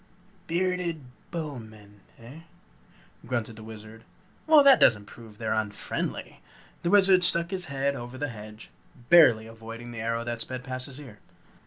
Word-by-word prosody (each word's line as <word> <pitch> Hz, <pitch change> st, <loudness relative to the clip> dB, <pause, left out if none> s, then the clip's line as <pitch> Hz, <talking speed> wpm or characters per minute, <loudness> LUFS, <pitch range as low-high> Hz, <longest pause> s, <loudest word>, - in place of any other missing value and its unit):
"Bearded 175 Hz, -2 st, -1 dB, 0.3 s
Bowmen, 110 Hz, -, -8 dB, 0.2 s
eh?" 120 Hz, +7 st, -12 dB, 0.8 s
grunted 115 Hz, -2 st, -3 dB
the 110 Hz, -, -10 dB
Wizard. 110 Hz, 0 st, -11 dB, 0.4 s
"Well, 310 Hz, -2 st, +7 dB
that 275 Hz, -1 st, +7 dB
doesn't 105 Hz, -3 st, +4 dB
prove 110 Hz, -1 st, -14 dB
they're 110 Hz, -1 st, -2 dB
unfriendly." 110 Hz, -2 st, -4 dB, 0.4 s
The 170 Hz, -, -1 dB
Wizard 190 Hz, -2 st, +5 dB
stuck 170 Hz, 0 st, +3 dB
his 185 Hz, -2 st, -1 dB
head 140 Hz, 0 st, -1 dB
over 120 Hz, 0 st, -8 dB
the 145 Hz, +1 st, -3 dB
hedge, 110 Hz, -1 st, -11 dB, 0.4 s
barely 125 Hz, -11 st, +7 dB
avoiding 115 Hz, +1 st, -10 dB
the 115 Hz, -, -7 dB
arrow 115 Hz, +1 st, -2 dB
that 120 Hz, -1 st, -4 dB
sped 130 Hz, +1 st, -5 dB
past 130 Hz, -1 st, -5 dB
his 135 Hz, 0 st, -9 dB
ear. 125 Hz, -8 st, -12 dB
120 Hz, 150 wpm, -27 LUFS, 110-165 Hz, 0.8 s, Well